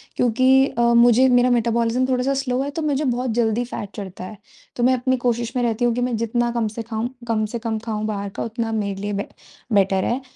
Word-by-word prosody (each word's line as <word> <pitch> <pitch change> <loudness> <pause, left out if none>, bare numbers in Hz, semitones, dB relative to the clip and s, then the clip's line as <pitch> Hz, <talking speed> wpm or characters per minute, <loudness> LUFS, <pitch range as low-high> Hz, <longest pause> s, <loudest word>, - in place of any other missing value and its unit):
क्योंकि 260 +3 +4
अ, 240 - -3
मुझे 240 +2 +6
मेरा 245 0 +4
मेटाबॉलिज़्म 235 +1 +1
थोड़ा-सा 255 +2 +1
स्लो 250 -1 -1
है 280 - -2
तो 320 - -4
मुझे 295 -1 0
बहुत 250 0 -1
जल्दी 225 +1 +1
फ़ैट 205 -4 -6
चढ़ता 190 -3 -7
है। 210 +2 -9 0.4
तो 240 - -2
मैं 255 +1 +4
अपनी 255 +1 0
कोशिश 235 +1 -1
में 245 - +1
रहती 235 +1 0
हूँ 240 - +2
कि 245 - -1
मैं 245 -1 0
जितना 235 +1 0
कम 235 -2 -1
से 230 - -2
खाऊँ 225 +1 -3 0.2
कम 215 -2 +1
से 235 - -2
कम 220 -1 -2
खाऊँ 215 -1 -3
बाहर 200 -2 -3
का - - -1
उतना 230 0 -3
मेरे 200 -3 -2
लिए 205 0 -3
बेट 200 - -4 0.4
बेटर 195 -1 +3
है। 250 +3 -1
235 Hz, 230 wpm, -21 LUFS, 220-250 Hz, 0.4 s, मुझे